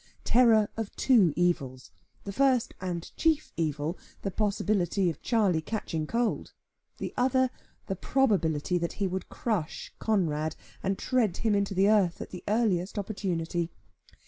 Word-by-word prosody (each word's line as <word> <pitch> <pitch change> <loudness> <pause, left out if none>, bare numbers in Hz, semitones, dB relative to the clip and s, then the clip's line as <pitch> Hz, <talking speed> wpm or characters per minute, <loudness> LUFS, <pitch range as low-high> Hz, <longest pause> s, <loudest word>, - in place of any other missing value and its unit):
Terror 230 -4 +5
of 225 -3 -4
two 220 - +4
evils; 140 -7 -1 0.3
the 200 - -5
first 260 -1 +2
and 175 -2 -4
chief 315 -2 +1
evil, 155 +1 -2 0.2
the 195 - -1
possibility 200 -2 +1
of 155 - -12
Charley 205 -9 +2
catching 160 -5 -3
cold; 235 +3 -1 0.4
the - - -5
other, 260 0 +2 0.3
the 195 - -3
probability 180 - +1
that 170 0 -2
he 200 - -2
would 190 -1 -3
crush 205 -10 -3
Conrad, 160 -7 0 0.3
and 195 0 -1
tread 235 -8 +1
him 225 -2 +1
into 200 -1 0
the 195 +2 +4
earth, 200 -5 +3
at - - -7
the 180 - -8
earliest 205 -4 +1
opportunity. 175 -5 -2
195 Hz, 145 wpm, -28 LUFS, 170-220 Hz, 0.4 s, Terror